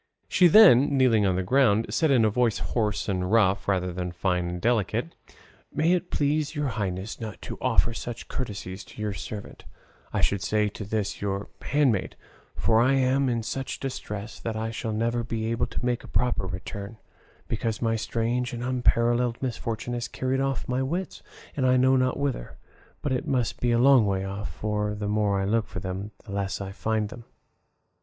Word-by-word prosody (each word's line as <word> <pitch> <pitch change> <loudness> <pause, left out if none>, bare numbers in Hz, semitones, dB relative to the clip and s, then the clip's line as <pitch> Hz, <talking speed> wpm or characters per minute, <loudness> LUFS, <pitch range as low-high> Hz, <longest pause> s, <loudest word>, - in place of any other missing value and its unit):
She 180 - +5
then, 145 - +7
kneeling 115 -6 +4
on 95 - +1
the 95 - 0
ground, 115 -1 +3
said 160 - +2
in 125 -5 +4
a - - +4
voice 120 -1 +2
hoarse 105 -3 -1
and 90 -2 -1
rough, 100 -4 +3
rather 90 -2 0
than 90 0 -3
fine 90 0 -1
and 90 0 -4
delicate, 115 - 0 0.6
"May 155 +4 +2
it 180 0 -1
please 150 +2 0
your 145 -2 0
highnesses 100 -1 -4
not 110 -5 -6
to - - -7
offer 120 - +2
such 120 0 -6
courtesies 100 -6 -5
to - - -15
this - - -18
your 105 -1 -2
servant, 100 +4 -7 0.5
I - - -1
should 100 -1 +1
say 105 -1 +1
to 105 0 -7
this 105 0 -2
your 100 0 -2
handmaid, 135 -9 +1 0.4
for 115 0 +3
I 130 +3 +4
am 135 0 +2
in 115 -2 -1
such 135 +4 -4
distress 105 -5 -5
that 115 -1 -4
I 110 +1 -2
shall 115 0 -4
never 115 +2 0
be 115 -1 -2
able 115 - 0
to - - -4
make 125 -1 0
a - - -11
proper 120 -6 0
return, 100 +4 -6 0.5
because 115 -1 -2
my 115 -1 +1
strange 120 +3 -1
and 120 0 -4
unparalleled 120 -1 +2
misfortune 120 -2 -3
has 120 0 -2
carried 130 +2 -1
off 135 -1 -1
my 125 +1 0
wits, 170 +8 -3 0.3
and 135 - -1
I 130 0 +4
know 130 +1 +4
not 130 0 +1
whither; 140 - -3 0.5
but 145 - -1
it 125 - -1
must 125 -5 0
be 120 - +1
a 120 - +3
long 125 -3 +6
way 95 -1 0
off, 100 -3 -5
for 105 +5 -2
the 105 0 -3
more 105 -1 +1
I 95 - 0
look 110 +2 +1
for 90 - -6
them 95 +2 -4 0.2
the 105 - -9
less 100 0 -2
I 95 -1 -5
find 110 +1 -1
them." 120 +1 -10
115 Hz, 195 wpm, -26 LUFS, 100-125 Hz, 0.6 s, then